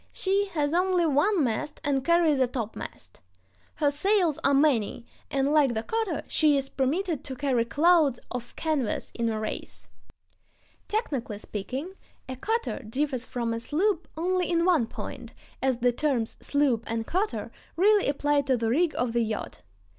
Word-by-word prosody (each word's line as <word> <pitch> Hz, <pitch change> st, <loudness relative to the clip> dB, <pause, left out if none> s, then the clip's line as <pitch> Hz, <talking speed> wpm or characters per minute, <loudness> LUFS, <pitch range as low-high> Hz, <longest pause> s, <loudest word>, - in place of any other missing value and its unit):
She 395 Hz, +1 st, +1 dB
has 295 Hz, -1 st, +1 dB
only 360 Hz, 0 st, +2 dB
one 325 Hz, +4 st, +3 dB
mast 240 Hz, +4 st, -2 dB
and 275 Hz, -2 st, 0 dB
carries 330 Hz, -2 st, +3 dB
a 260 Hz, -, +4 dB
topmast. 225 Hz, -, -7 dB, 0.5 s
Her 290 Hz, -2 st, +2 dB
sails 350 Hz, 0 st, +2 dB
are 275 Hz, -, +4 dB
many, 255 Hz, -6 st, +2 dB, 0.2 s
and, 275 Hz, +1 st, +1 dB
like 280 Hz, -6 st, +4 dB
the 220 Hz, -, -1 dB
cutter, 445 Hz, -, -2 dB
she 300 Hz, -3 st, +3 dB
is 270 Hz, 0 st, -2 dB
permitted 305 Hz, +4 st, -1 dB
to 265 Hz, -, -5 dB
carry 255 Hz, -3 st, +1 dB
clouds 300 Hz, -1 st, +3 dB
of 245 Hz, -1 st, -6 dB
canvas 300 Hz, -8 st, -1 dB
in 230 Hz, -1 st, -1 dB
a 220 Hz, -1 st, -2 dB
race. 215 Hz, -, -6 dB, 1.0 s
Technically 275 Hz, -, -2 dB
speaking, 255 Hz, -, -5 dB, 0.3 s
a 260 Hz, -, -5 dB
cutter 450 Hz, -, -2 dB
differs 255 Hz, +2 st, -2 dB
from 235 Hz, -2 st, -2 dB
a 230 Hz, -, -2 dB
sloop 335 Hz, -, 0 dB
only 360 Hz, +2 st, 0 dB
in 340 Hz, -1 st, +2 dB
one 330 Hz, -11 st, +3 dB
point, -, -, -8 dB, 0.3 s
as 260 Hz, -2 st, +1 dB
the 245 Hz, +1 st, +2 dB
terms 245 Hz, -3 st, 0 dB
"sloop" 275 Hz, -6 st, +1 dB
and 225 Hz, 0 st, -2 dB
"cutter" 395 Hz, -, -2 dB, 0.2 s
really 410 Hz, +3 st, +4 dB
apply 290 Hz, +1 st, +2 dB
to 265 Hz, -2 st, +1 dB
the 225 Hz, -1 st, -1 dB
rig 320 Hz, +5 st, +2 dB
of 240 Hz, -2 st, -1 dB
the 235 Hz, -, +2 dB
yacht. 220 Hz, -2 st, -4 dB
285 Hz, 160 wpm, -27 LUFS, 245-340 Hz, 1.0 s, a